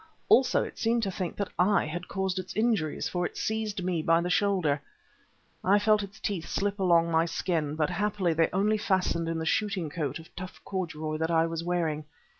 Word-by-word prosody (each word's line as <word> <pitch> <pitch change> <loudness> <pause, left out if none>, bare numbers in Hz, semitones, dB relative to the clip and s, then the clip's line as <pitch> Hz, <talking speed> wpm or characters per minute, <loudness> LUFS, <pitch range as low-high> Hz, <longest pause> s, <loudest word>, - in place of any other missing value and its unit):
Also 260 - +5
it - - -8
seemed 230 0 +1
to 195 - -1
think 185 -1 -4
that 200 - -3
I 190 +1 +4
had 175 +4 -5
caused 190 -1 -1
its 185 0 -7
injuries, 215 -9 +1
for 180 -1 -2
it - - -4
seized 215 -3 -2
me 175 -3 0
by 165 +1 +4
the 175 +1 -1
shoulder. 180 -8 +2 0.8
I 195 +2 +5
felt 215 0 +3
its 195 0 -9
teeth 185 -5 -3
slip 205 0 -1
along 170 -3 +4
my 165 0 +3
skin, 165 -3 -1
but 155 +1 0
happily 190 -2 0
they 165 0 +2
only 210 +3 +2
fastened 185 -4 0
in 165 - -1
the 160 - -3
shooting 190 -3 0
coat 150 -5 -2
of 165 0 -14
tough 185 +1 -8
corduroy 160 -5 -3
that 160 +1 -1
I 165 -1 +3
was 165 0 -3
wearing. 165 -4 -1
180 Hz, 205 wpm, -28 LUFS, 165-200 Hz, 0.8 s, Also